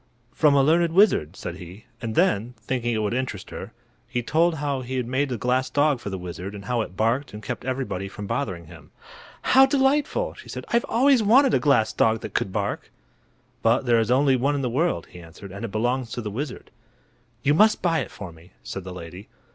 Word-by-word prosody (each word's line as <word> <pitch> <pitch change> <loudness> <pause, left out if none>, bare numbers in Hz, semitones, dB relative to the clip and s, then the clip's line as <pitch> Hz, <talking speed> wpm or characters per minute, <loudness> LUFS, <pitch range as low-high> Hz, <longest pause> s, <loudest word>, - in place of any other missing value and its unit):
"From 150 -3 +4
a 140 - +5
learned 165 +3 +3
wizard," 170 - +3
said 85 -2 -6
he; 95 +4 -11 0.2
and 115 -2 -4
then, 115 +5 +1
thinking 120 +1 -2
it 110 - 0
would 105 - -1
interest 125 -6 -4
her, - - -7 0.4
he 120 - -2
told 165 +6 +2
how 145 -3 -2
he 130 +1 -5
had 125 - -1
made 130 +4 0
the 125 - -2
glass 130 +3 0
dog 145 -2 +2
for 105 - -6
the 95 - -4
wizard, 90 +2 -7
and 100 -1 -9
how 120 +1 0
it 95 -4 -7
barked 115 +3 0
and 105 - -9
kept - - -5
everybody 130 -8 -3
from 100 +1 -8
bothering 90 -3 -3
him. - - -14 0.5
"How 265 +1 +6
delightful!" 285 - +1
she - - -14
said. - - -6
"I've 235 0 +2
always 260 +1 +4
wanted 250 +5 +5
a - - +4
glass 135 -7 +2
dog 110 0 +2
that - - -7
could 95 - -1
bark." 100 +1 -3 0.7
"But 115 +3 +2
there 120 -2 +4
is 115 - 0
only 135 +1 +4
one 140 +4 +1
in 140 - -2
the 125 - -1
world," 155 - 0
he 90 - -11
answered, 85 +4 -12
"and 100 +4 -8
it 115 - -4
belongs 120 +3 -1
to 120 - -3
the 105 - -4
wizard." 130 +5 -6 0.7
"You 145 - +3
must 215 +7 +4
buy 165 -2 +2
it 130 - -4
for 100 -4 -9
me," 80 +3 -18
said 95 - -6
the 95 - -7
lady. 90 +3 -9
120 Hz, 225 wpm, -24 LUFS, 100-145 Hz, 0.7 s, How